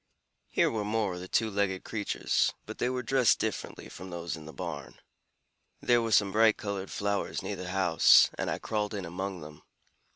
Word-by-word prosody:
Here - - +2
were 110 -2 -2
more 105 -2 -1
of 90 - -6
the 90 - -8
two 110 +3 +1
legged 95 -2 -1
creatures, 105 -3 0
but - - -9
they 120 - +1
were 125 0 -2
dressed 130 -5 +3
differently - - -4
from 95 +1 -10
those 85 -1 -4
in 80 -2 -11
the - - -8
barn. 80 -6 -6 0.8
There 120 -1 +3
were 115 -1 -2
some 100 -2 +4
bright 110 +1 +4
colored 100 -2 -4
flowers 100 0 -2
near - - -3
the 90 0 -6
house, 90 -4 +5
and - - -3
I - - -1
crawled 105 -1 -2
in 100 -2 -4
among 90 +1 -5
them. 75 0 -11
100 Hz, 195 wpm, -29 LUFS, 90-110 Hz, 0.8 s, house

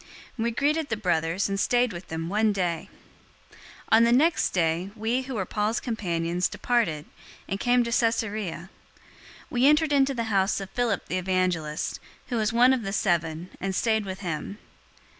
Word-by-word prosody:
We 230 0 0
greeted 290 +5 0
the 225 - -1
brothers, 175 -2 0
and 195 0 -2
stayed 245 +1 +2
with 175 +1 -8
them 160 0 -4
one 210 +3 +2
day. 175 -4 -2 0.6
021:008 - - -20 0.3
On 225 +1 +7
the 235 - +4
next 305 +7 +3
day, 170 +1 0
we, 230 +4 0
who 260 -1 -6
were 190 -4 -1
Paul's 210 +4 -1
companions, 175 -6 -1
departed, 215 -12 0 0.4
and 195 - -3
came 245 +2 +3
to 235 - -4
Caesarea. 215 -6 -1 0.8
We 250 +2 +3
entered 300 0 +4
into 275 -1 +3
the 230 - -1
house 195 +1 +2
of 195 -1 -7
Philip 240 -5 -1
the 185 - -1
evangelist, 180 -5 -1 0.3
who 245 - -1
was 215 0 +1
one 245 +3 +5
of 260 - 0
the 195 -2 -4
seven, 170 -3 -1
and 190 0 -2
stayed 220 -1 +1
with 190 0 -6
him. 175 +2 -4
210 Hz, 175 wpm, -26 LUFS, 180-240 Hz, 0.8 s, On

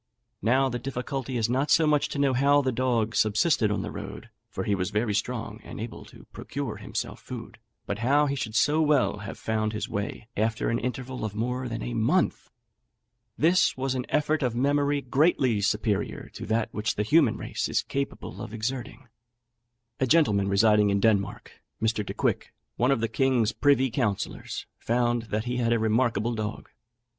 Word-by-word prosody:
Now 130 +6 +3
the 120 -1 -3
difficulty 130 0 -4
is 115 - +1
not 130 +5 0
so 160 - +5
much 150 -1 +2
to - - -5
know 140 -2 +2
how 140 +3 +4
the 130 - +1
dog 120 -3 0
subsisted 110 +2 +3
on 105 - -1
the - - -5
road - - -8 0.2
(for - - -4
he 105 - 0
was 90 -1 -1
very 105 +1 0
strong, 110 +1 -3
and - - -9
able 115 +2 -7
to - - -15
procure - - -5
himself - - -5
food), - - -8 0.3
but 100 - -3
how 140 +5 +3
he 140 - 0
should 110 -5 -4
so 150 +5 +3
well 145 -8 +2
have 105 - -7
found 110 -1 -1
his 110 - -3
way 105 +1 -4
after 110 +1 0
an 115 - 0
interval 125 0 -4
of 105 -2 -3
more 125 +3 -2
than 115 0 -4
a 120 - -4
month! 120 +11 +1 0.9
This 170 0 +3
was 130 0 -1
an 125 -1 -3
effort 150 +1 +1
of 125 -3 0
memory 145 +2 +2
greatly 130 -4 +2
superior 105 0 -1
to - - -7
that 110 +1 0
which 105 +1 -1
the 105 - 0
human 150 +8 +4
race - - -3
is - - +1
capable 140 0 -4
of 115 - -6
exerting." 120 +1 -4 0.9
A 130 - +2
gentleman 110 -10 +3
residing 105 +1 +4
in 100 0 +2
Denmark, 100 -2 0 0.2
Mr. 110 -1 0
Decouick, - - -2 0.2
one 125 - +2
of 135 -5 +2
the 115 - +1
king's 120 -1 +2
privy 135 -3 +3
councillors, 110 -6 -2
found 120 -1 0
that 105 +1 -1
he 125 0 -2
had 115 -1 +1
a 120 - +4
remarkable 115 0 +1
dog. 110 -1 -4
120 Hz, 185 wpm, -27 LUFS, 110-135 Hz, 0.9 s, so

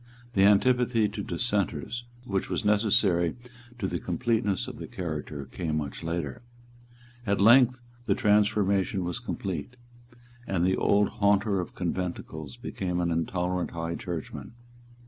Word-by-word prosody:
The 95 -2 +5
antipathy 115 +2 +4
to 105 - -5
Dissenters, 105 - -2 0.2
which 95 -5 -2
was - - -2
necessary 105 -5 +3 0.4
to 110 - -3
the 90 -2 -2
completeness 105 +1 0
of - - -7
the - - -7
character, 75 -4 -5
came 75 +4 -3
much 75 -3 -4
later. 80 - -3 0.9
At 100 0 +2
length 120 +4 +6 0.3
the - - +3
transformation 100 -2 +2
was 90 +6 -3
complete; 100 - -4 0.7
and 90 -2 +1
the 95 +1 +3
old 100 0 +3
haunter 100 0 +2
of 90 - -5
conventicles 85 -6 -4
became 90 -2 -3
an 85 -1 0
intolerant 90 +2 -1
High 85 0 -2
Churchman. 85 +5 -6
95 Hz, 130 wpm, -28 LUFS, 85-105 Hz, 0.9 s, length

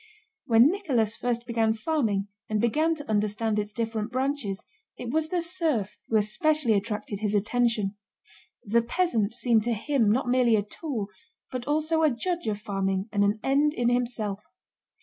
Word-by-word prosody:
When 235 +5 +6
Nicholas 255 - 0
first 240 -1 -2
began 225 -2 +1
farming 220 -7 0 0.2
and 215 -1 0
began 305 +9 +2
to 290 -2 -9
understand 215 +1 0
its 210 0 -3
different 225 0 -3
branches, 260 -6 -2 0.3
it 235 - -5
was 315 +1 +1
the 350 -1 0
serf 315 - -1
who 225 - -1
especially 240 - +2
attracted 210 0 -2
his 210 -1 0
attention. 210 -1 +1 0.7
The 230 +3 +2
peasant 235 - 0
seemed 235 -3 +3
to 240 - +1
him 230 0 +1
not 250 +3 +1
merely 245 -2 +4
a 205 - +1
tool, 220 - -5 0.4
but 255 -1 -5
also 310 +2 +1
a 310 - +5
judge 345 +5 -2
of 210 -1 -1
farming 195 -1 -2
and 205 -2 +2
an 205 +2 +1
end 290 +3 +2
in 240 -1 +2
himself. 235 -5 -1
235 Hz, 165 wpm, -27 LUFS, 210-280 Hz, 0.7 s, When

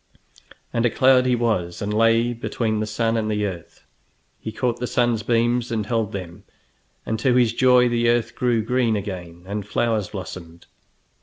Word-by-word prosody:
And 115 - +1
a 120 - +3
cloud 130 +2 +4
he 125 - +3
was, 105 -8 -1
and 105 0 -3
lay 115 +2 +3
between 115 -2 -2
the 110 - -2
sun 115 +1 0
and 110 -1 -1
the 105 -1 0
earth. 90 -4 -8 0.5
He 110 - -6
caught 120 +1 -2
the 125 - -2
sun's 120 -3 +1
beams 120 +1 +1
and 110 -2 -1
held 110 -2 -1
them, 95 -1 -7 0.6
and 110 - -2
to 125 +1 +2
his 120 -2 +3
joy 125 0 +4
the 120 -1 +1
earth 120 -1 +1
grew 120 -3 0
green 120 -1 +1
again 90 -4 -6
and 100 +2 -4
flowers 110 0 -1
blossomed. 85 -4 -9
115 Hz, 175 wpm, -22 LUFS, 105-120 Hz, 0.6 s, cloud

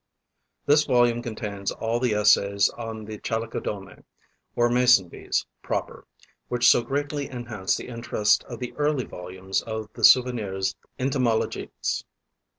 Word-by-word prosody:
This 150 +1 +4
volume 120 -2 +3
contains 105 -4 -4
all 115 +1 -2
the 120 -4 +1
essays 100 -1 +4
on 115 -2 -7
the 105 0 -8
Chalicodomae, 110 -3 -4 0.5
or 120 - +3
Mason 125 -6 +4
bees - - -2 0.2
proper, - - -4 0.4
which 120 0 +2
so 120 - +6
greatly 145 +2 -3
enhance 120 -6 -2
the - - -8
interest 115 -3 +1
of - - -8
the 125 -1 -6
early 145 -3 +1
volumes 90 +2 -4
of 110 -1 -5
the - - -9
"Souvenirs 105 -7 +4 0.2
entomologiques." 130 -4 -1
115 Hz, 130 wpm, -25 LUFS, 105-125 Hz, 0.5 s, so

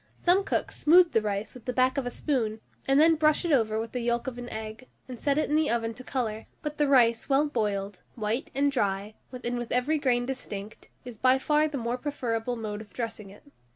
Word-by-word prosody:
Some 365 +3 +3
cooks - - -2
smooth 345 +3 +6
the 225 - +3
rice 205 0 -3
with 250 - -13
the 250 - -2
back 255 +1 +2
of 275 -3 -1
a - - 0
spoon, 235 -5 -1 0.3
and 270 +1 +4
then 325 +2 +6
brush 305 +2 +3
it 340 - 0
over 220 -5 +2
with 225 0 -4
the 250 - -3
yolk 235 0 -1
of 250 -2 -5
an 245 0 -7
egg, 220 +3 -7 0.2
and 250 -3 -8
set 280 -1 +1
it 310 - +1
in 300 - 0
the 310 -1 +2
oven 230 -1 0
to 255 - -10
colour; 225 -5 -3 0.2
but 300 0 -5
the 295 - +3
rice 235 -3 +4
well 275 +2 +4
boiled, 205 -7 -2
white, 220 +2 -2 0.2
dry, 205 -5 -1 0.2
and 245 -1 -3
with 240 - -6
every 280 +6 +1
grain 245 -3 +1
distinct, 215 -5 -7 0.2
is 245 -3 -9
by 255 +1 +4
far 300 +3 +2
the 295 -2 -4
more 240 0 -2
preferable 245 -4 -2
mode 215 -2 -5
of 215 - -13
dressing 225 -4 -5
it. 200 - -15
245 Hz, 225 wpm, -27 LUFS, 220-275 Hz, 0.3 s, smooth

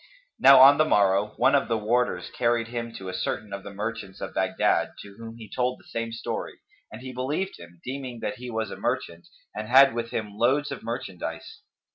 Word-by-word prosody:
Now 135 -1 +8
on 140 +2 +8
the 155 - +5
morrow, 100 -4 +2
one - - +4
of 140 - +3
the 115 - 0
warders 110 -4 0
carried 120 -1 0
him 115 -1 -4
to 95 - -8
a 90 - -5
certain 100 +2 -3
of 100 - -5
the 100 - -9
merchants 105 -1 -5
of - - -6
Baghdad, - - +1
to 100 -1 -13
whom 115 0 -9
he 110 -2 -10
told 125 +2 -1
the - - -20
same 115 0 -4
story, 115 0 -5 0.3
and 115 +4 -10
he 130 -1 -7
believed 145 +10 -3
him, 85 0 -14
deeming 130 -2 -5
that 105 - -3
he 125 +1 -8
was 110 -1 -3
a - - -7
merchant 85 0 -3 0.3
and 110 0 -5
had 135 +2 +7
with 115 0 -3
him 105 -3 -4
loads 135 +7 +1
of - - -6
merchandise. 110 -6 -6
115 Hz, 210 wpm, -26 LUFS, 105-125 Hz, 0.3 s, Now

